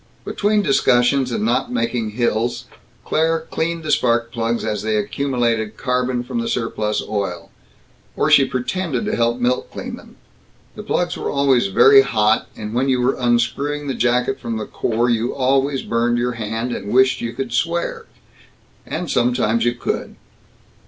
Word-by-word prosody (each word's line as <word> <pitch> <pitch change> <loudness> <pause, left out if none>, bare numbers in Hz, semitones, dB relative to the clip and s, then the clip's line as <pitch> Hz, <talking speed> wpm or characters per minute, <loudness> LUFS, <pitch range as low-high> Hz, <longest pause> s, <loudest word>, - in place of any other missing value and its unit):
Between 210 0 +1
discussions 130 -3 +3
and 110 -2 -1
not 125 +3 0
making 115 -2 -1
hills, 120 +1 0 0.4
Claire 160 +1 +1
cleaned 165 0 -2
the 155 - -2
spark 115 -2 +1
plugs 115 0 -2
as 105 -1 -2
they 110 0 0
accumulated 115 -1 -1
carbon 125 -1 -1
from 235 - -4
the 230 - -2
surplus 110 - -1
oil 100 -2 -4 0.6
or - - +1
she 135 - +7
pretended 130 +2 -2
to - - -1
help 120 0 +1
Milt 125 +1 0
clean - - -6
them. - - -16 0.6
The - - -8
plugs - - -1
were - - -3
always 135 -5 +2
very 135 +7 +7
hot, 110 -4 +1
and 105 0 -6
when 130 +3 +1
you 130 -1 +2
were 125 +2 +2
unscrewing 130 +5 0
the 135 - -1
jacket 125 +2 +1
from 115 -3 -4
the 110 - -4
core, 115 +2 -1
you 120 0 0
always 135 +1 +1
burned 120 +1 0
your 120 +1 0
hand, 115 +1 -3
and 100 -3 -5
wished 130 +2 +3
you 115 0 -3
could 130 -3 -5
swear... 170 +6 -1 0.8
and - - -4
sometimes 120 -2 +1
you 120 0 +1
could. - - -4
120 Hz, 165 wpm, -20 LUFS, 115-135 Hz, 0.8 s, she